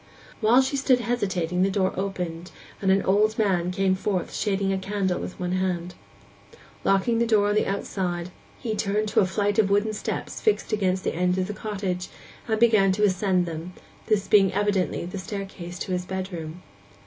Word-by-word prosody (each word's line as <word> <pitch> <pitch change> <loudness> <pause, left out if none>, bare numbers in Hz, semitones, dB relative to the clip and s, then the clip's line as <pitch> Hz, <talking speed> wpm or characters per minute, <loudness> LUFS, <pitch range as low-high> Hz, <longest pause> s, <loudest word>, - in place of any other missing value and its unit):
While 235 +4 +5
she 270 +2 -1
stood 260 -2 +3
hesitating 185 -7 -1
the 195 - +3
door 190 -1 +1
opened, 180 -3 -4 0.3
and 195 - +1
an 195 +1 +4
old 210 +3 +2
man 185 -5 +1
came 190 +1 +1
forth 190 -1 -2
shading 195 -2 0
a 190 - -1
candle 190 -2 -1
with - - -7
one 180 -1 -2
hand. 180 -1 -1 0.9
Locking 195 +4 +2
the 235 - +2
door 210 -2 +3
on - - +2
the 210 - +2
outside, 180 -3 -3 0.3
he 230 -4 -3
turned 210 0 0
to 210 - +2
a 190 - +4
flight 205 +2 0
of 205 -3 +4
wooden 205 +2 +2
steps 210 - -4
fixed 425 - +1
against 190 -3 +1
the - - -1
end 180 +2 +1
of 185 - +1
the 210 - -5
cottage, 195 -4 -3 0.4
and 220 -1 0
began 215 -4 +5
to 210 +2 0
ascend 185 -2 +2
them, 165 +2 -6 0.3
this 210 -3 +1
being 195 -2 +5
evidently 200 -4 0
the 180 +2 -6
staircase 190 -3 -6
to 185 - -5
his 180 0 -1
bedroom. 180 -3 -5
195 Hz, 185 wpm, -25 LUFS, 180-210 Hz, 0.9 s, While